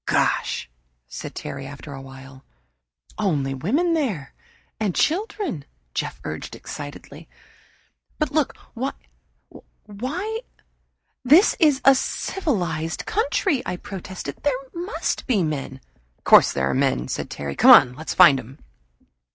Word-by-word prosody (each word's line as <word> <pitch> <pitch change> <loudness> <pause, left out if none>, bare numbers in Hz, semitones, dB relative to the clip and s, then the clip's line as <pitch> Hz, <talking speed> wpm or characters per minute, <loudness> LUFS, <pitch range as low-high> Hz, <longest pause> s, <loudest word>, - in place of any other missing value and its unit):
"Gosh!" - - +1 0.4
said - - -8
Terry, 135 - -6
after 145 +1 -9
a 135 - -8
while. 135 0 -12 0.8
"Only 145 -10 0
women 275 - +1
there 215 - -2 0.5
and 205 -5 -1
children," 345 - -1 0.3
Jeff - - -3
urged - - -6
excitedly. 145 +2 -9 0.9
"But 305 -2 0
they - - -8
look 305 -4 +1 1.3
why, 300 - -4 0.8
this 305 - +6
is 295 -5 +4
a 275 - +9
civilized 180 - -2
country!" 400 - 0
I 180 - -3
protested. 185 -6 -7
"There 285 -3 +1 0.2
must 350 +5 -3
be 215 -9 +2
men." 140 -4 -3 0.4
"Of - - -40
course - - +7
there 65 -1 0
are 70 - 0
men," 60 -1 +1
said - - -4
Terry. 70 -1 -5
"Come - - +5
on, 125 - +9
let's 160 +5 -5
find 165 -7 +7
'em." 130 +3 -11
180 Hz, 125 wpm, -23 LUFS, -, 1.3 s, a